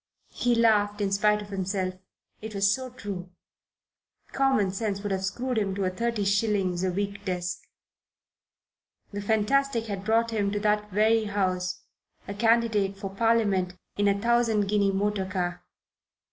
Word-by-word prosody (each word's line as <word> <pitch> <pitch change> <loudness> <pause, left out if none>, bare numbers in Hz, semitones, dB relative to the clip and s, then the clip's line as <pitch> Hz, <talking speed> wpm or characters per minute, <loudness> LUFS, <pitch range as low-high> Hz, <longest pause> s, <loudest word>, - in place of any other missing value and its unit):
He 245 -1 +1
laughed 210 -3 +3
in 200 -1 0
spite 210 +1 +2
of 205 - -13
himself. 190 -1 -2 0.5
It 215 -1 -7
was 200 0 +3
so 260 +1 -4
true. 205 -7 -7 1.0
Common 265 -8 +2
sense 200 0 -3
might 205 - -2
have 190 0 -1
screwed 240 +5 -1
him 195 -2 -1
to 200 - -1
a 185 - 0
thirty 230 +1 -1
shillings 195 -3 +1
a 185 - +1
week 200 +2 -3
desk: 180 -2 -3 1.5
the 205 0 -4
fantastic 225 +4 +1
had 200 -3 -5
brought 225 +2 +2
him 205 -3 0
to 205 - 0
that 210 0 +1
very 215 +3 +3
house, 185 -3 -1 0.4
a 200 - -4
candidate 220 -2 +2
for 195 -1 -5
Parliament, 200 -4 +1 0.2
in 205 0 +1
a 200 0 +2
thousand 230 -2 +2
guinea 200 -1 +2
motor 200 0 -1
car. 180 -1 -3
205 Hz, 155 wpm, -27 LUFS, 195-225 Hz, 1.5 s, laughed